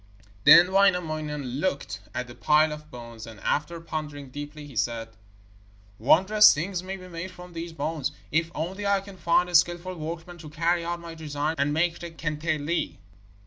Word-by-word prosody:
Then 180 +2 +9
Wainamoinen 155 -8 +1
looked 185 -5 -2 0.2
at 125 - -2
the 120 - -11
pile 150 +5 +3
of 150 0 -8
bones, 115 -3 -9
and 110 -3 -11
after 165 +3 -1
pondering 150 -4 -6
deeply 145 +2 -7
he 140 -4 -12
said: 115 0 -1 0.9
'Wondrous 190 - +6
things 175 +4 -2
may 190 +1 -5
be 185 -1 -11
made 170 +1 -6
from 180 -1 -12
these 165 0 -5
bones, 150 -2 -2 0.2
if 165 +2 +1
only 190 +6 -3
I 200 -1 +3
can 195 0 -11
find 175 +1 +2
a 180 - -8
skilful 175 +2 +3
workman 170 +1 -7
to 155 -2 -9
carry 170 +3 +1
out 170 +1 -3
my 170 -1 -8
designs 155 0 -3
and 140 +1 +2
make 170 +2 +1
the 170 - -6
kantele.' 155 0 -2
160 Hz, 175 wpm, -26 LUFS, 150-175 Hz, 0.9 s, Then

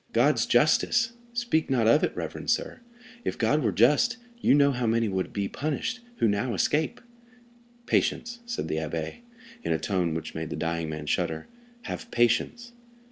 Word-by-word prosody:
"God's - - +3
justice! 230 0 +3 0.2
Speak 235 -11 0
not 125 -4 +2
of 115 +7 +5
it, - - +2
reverend - - -5
sir. - - 0 0.4
If - - -2
God 135 +7 +2
were 110 - +1
just, 145 - +3 0.2
you 140 - +4
know 140 -1 +5
how 125 -3 -1
many 115 0 +2
would 95 -2 -2
be 100 -1 -2
punished 155 - -3 0.2
who 115 - +2
now 105 +3 0
escape." 150 +10 +1 0.9
"Patience," 235 0 0
said 240 - -3
the 80 - -2
abbé, 80 0 -3 0.4
in - - -2
a 80 - +2
tone 90 -3 -1
which 80 - -5
made 80 0 -4
the - - -4
dying 85 -1 -2
man 75 -1 -5
shudder; 80 +2 -1 0.4
"have 230 +1 -6
patience!" 120 - +1
115 Hz, 170 wpm, -27 LUFS, -, 0.9 s, of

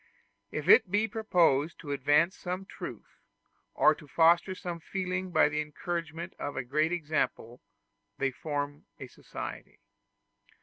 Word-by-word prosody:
If - - -5
it 445 - +7
be 210 +3 +2
proposed 175 - +2
to 145 - -6
advance 145 +5 +3
some 185 +1 -5
truth, - - -9 0.6
or - - +6
to 150 - -14
foster 170 +5 +4
some 175 -2 -5
feeling 185 +1 -3
by 155 -4 +4
the 150 +1 -1
encouragement 165 +2 -5
of 145 - -4
a 135 - -1
great 155 +6 +1
example, 155 -7 -2 0.6
they 135 -1 0
form 145 +1 -4
a - - -6
society. - - -8
165 Hz, 135 wpm, -30 LUFS, 145-180 Hz, 0.6 s, it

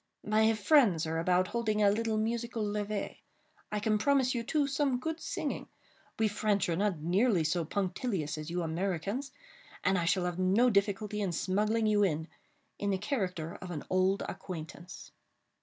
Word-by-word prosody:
My 220 +1 +4
friends 210 - +4
are 160 +1 -1
about 180 +2 +2
holding 215 -3 0
a 200 - +6
little 220 +1 0
musical 230 +1 -1
levée. 205 0 -3 0.5
I 210 - -1
can 215 0 +1
promise 265 +1 +3
you, 240 - -1
too, 290 +5 +1
some 280 -2 +1
good 320 +4 -3
singing. - - -3 0.5
We 220 - +3
French 210 -1 0
are 165 - +1
not 200 -1 0
nearly 185 +3 +2
so 165 +2 0
punctilious 190 - -2
as 155 +1 -6
you 175 +1 -1
Americans, 195 - -2 0.5
and 185 0 +3
I 170 - -1
shall 185 0 +2
have 180 0 -3
no 200 +7 +4
difficulty 205 +1 0
in 195 -3 0
smuggling 210 +6 +1
you 210 -1 +3
in, 160 -5 +1 0.5
in 205 - -1
the 195 - +1
character 185 - -2
of 185 - -7
an 160 -5 -5
old 185 +1 +2
acquaintance." 175 0 -8
205 Hz, 170 wpm, -31 LUFS, 180-220 Hz, 0.5 s, a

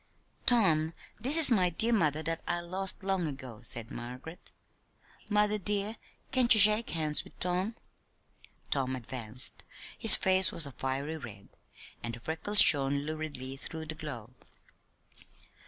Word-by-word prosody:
"Tom, 165 -9 +1 0.2
this 275 +6 0
is 315 -5 +8
my 185 -6 +1
dear 225 +8 -1
mother 155 -7 -2
that 165 0 -6
I 175 - -2
lost 190 +3 0
long 190 -3 -3
ago," 130 -6 -11
said 120 -1 -3
Margaret. 125 +8 -11 0.8
"Mother, 210 0 0
dear, 205 +2 -3 0.4
can't 250 -2 0
you - - +6
shake 215 +2 +6
hands 155 -2 0
with - - -21
Tom?" 180 +5 -4 1.0
Tom 130 -2 -2
advanced. 125 -1 -4 0.3
His - - +10
face 185 -2 +3
was 165 - +1
a 140 - -9
fiery 135 +5 -6
red, 105 -8 -14 0.5
and 115 0 -8
the - - -15
freckles 165 - +1
shone 140 -1 +2
luridly 145 -4 -8
through 160 +3 -10
the 160 - -8
glow. 140 -8 -11
160 Hz, 140 wpm, -27 LUFS, 135-195 Hz, 1.0 s, His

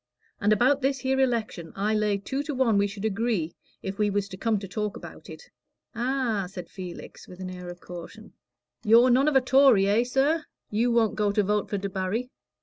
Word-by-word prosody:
And 210 - +2
about 255 +7 +3
this 270 -1 0
here 265 +1 0
election, 230 -10 -1
I 205 +2 0
lay 210 -1 +1
two 265 +8 -3
to 295 - -3
one 235 -6 +3
we 200 - +2
should 200 +1 -6
agree 210 -6 -1 0.3
if 195 +2 -5
we 210 -1 +2
was 200 0 -1
to 190 - -7
come 220 +3 0
to 195 0 -6
talk 210 +1 -3
about - - -11
it." - - -12 0.4
"Ah!" 240 -5 -1
said 180 -2 -9
Felix, 180 -3 -9
with 180 - -12
an 185 -1 -5
air 180 -1 -8
of 175 0 -10
caution. 195 +5 -10 0.5
"You're 235 +3 +6
none 265 +4 +4
of 300 - +2
a 265 - +6
Tory, 255 -5 +5
eh, 210 +4 +3
sir? 275 +6 +1 0.3
You 225 +4 +1
won't 230 -2 +2
go 210 -1 +1
to 210 0 +2
vote 210 +1 0
for 205 - -1
Debarry? 200 +5 -3
215 Hz, 210 wpm, -26 LUFS, 195-250 Hz, 0.5 s, You're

